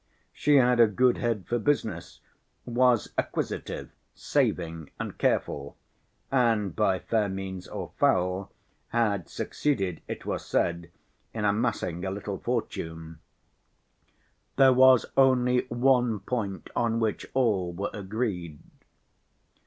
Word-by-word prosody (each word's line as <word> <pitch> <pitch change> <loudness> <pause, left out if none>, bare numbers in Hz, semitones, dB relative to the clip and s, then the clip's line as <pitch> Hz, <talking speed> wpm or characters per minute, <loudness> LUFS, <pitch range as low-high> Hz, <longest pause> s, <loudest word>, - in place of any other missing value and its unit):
She 145 0 +2
had 125 -2 +4
a 115 - +8
good 125 +4 +2
head 115 -5 -1
for 120 - -1
business, 110 - -2 0.4
was 120 -1 +2
acquisitive, - - -3 0.2
saving 80 -2 -1
and - - -5
careful, 70 +1 -1 0.5
and 115 -7 +2
by 100 -4 +2
fair 105 +2 0
means 95 -1 -6
or - - -6
foul 90 +1 +1 0.4
had 105 -7 0
succeeded, 100 - -2
it - - -6
was - - -3
said, 85 0 -1 0.5
in 105 -2 -1
amassing 100 -5 0
a 95 - -1
little 100 0 -5
fortune. 80 -9 -4 1.4
There 135 -1 +6
was 130 -1 +6
only 125 -2 +3
one 120 -3 +2
point 105 -6 -4
on 115 -1 +1
which 110 -2 -1
all 105 -9 +1
were 95 +4 -4
agreed. 95 -6 -3
105 Hz, 115 wpm, -27 LUFS, 95-125 Hz, 1.4 s, a